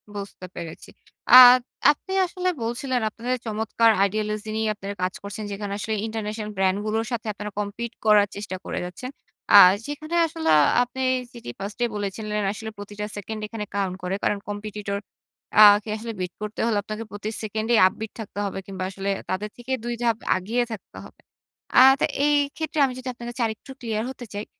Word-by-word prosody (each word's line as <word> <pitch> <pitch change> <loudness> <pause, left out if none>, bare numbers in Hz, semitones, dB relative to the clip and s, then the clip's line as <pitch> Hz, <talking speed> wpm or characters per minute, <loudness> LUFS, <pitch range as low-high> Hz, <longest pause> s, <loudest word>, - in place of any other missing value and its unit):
বুঝতে 200 -2 -7
পেরেছি। 170 -2 -8 0.4
আ - - +13 0.6
আপনি 380 +6 -7
আসলে 365 +1 -2
বলছিলেন 245 +2 -1
আপনাদের 240 +4 -3
চমৎকার 225 +1 +2
ideology 215 +1 -3
নিয়ে 220 0 0
আপনারা 200 0 -6
কাজ 185 - 0
করছেন। 205 +1 -6
যেখানে 200 0 -4
আসলে 220 +2 -3
ইন্টারন্যাশনাল 215 -1 -4
brand 190 0 +2
গুলোর 220 +1 0
সাথে 225 -2 -3
আপনারা 210 +1 -6
compete 220 +3 -4
করার 210 -1 +6
চেষ্টা 200 -2 -5
করে - - -3
যাচ্ছেন। 180 +8 -7 0.4
আ - - +11 0.3
যেখানে 310 +3 -5
আসলে 320 0 -3
আ - - +6 0.2
আপনি 250 +2 -6 0.3
যেটি 235 - -9
first 200 +3 -6
এই 240 - +1
বলেছিলেন 210 +1 -3
আসলে 220 +1 -7
প্রতিটা 205 +1 -6
সেকেন্ড 215 +2 -5
এখানে 210 -1 -5
count 195 -2 -1
করে। 180 +2 -1
কারণ, 205 - +1
competitor 205 -1 -4 0.6
আ - - +10 0.2
কে - - -9
আসলে 230 +1 -6
beat 180 -1 -3
করতে 210 0 -6
হলে 225 -3 +1
আপনাকে 215 +2 -5
প্রতি 205 +1 -5
সেকেন্ডে 220 +2 -1
upbeat 220 +3 -6
থাকতে 205 -2 -6
হবে 195 - -4
কিংবা, 190 -1 -5
আসলে 195 +1 -4 0.2
তাদের 210 +3 -2
থেকে 245 +2 -8
২ 240 0 -2
ধাপ 230 -2 +2 0.2
এগিয়ে 220 +7 0
থাকতে 215 - -9
হবে। - - -17 0.6
আ - - +10 0.2
তা - - +3 0.2
এইক্ষেত্রে 295 +2 0
আমি 255 - -3
যদি 255 - -9
আপনার 240 0 -9
কাছে 245 - -6
আরেকটু 220 +4 -8
ক্লিয়ার 225 -1 -2
হতে 250 - -9
চাই, 205 +1 -4
215 Hz, 180 wpm, -24 LUFS, 205-235 Hz, 0.6 s, আ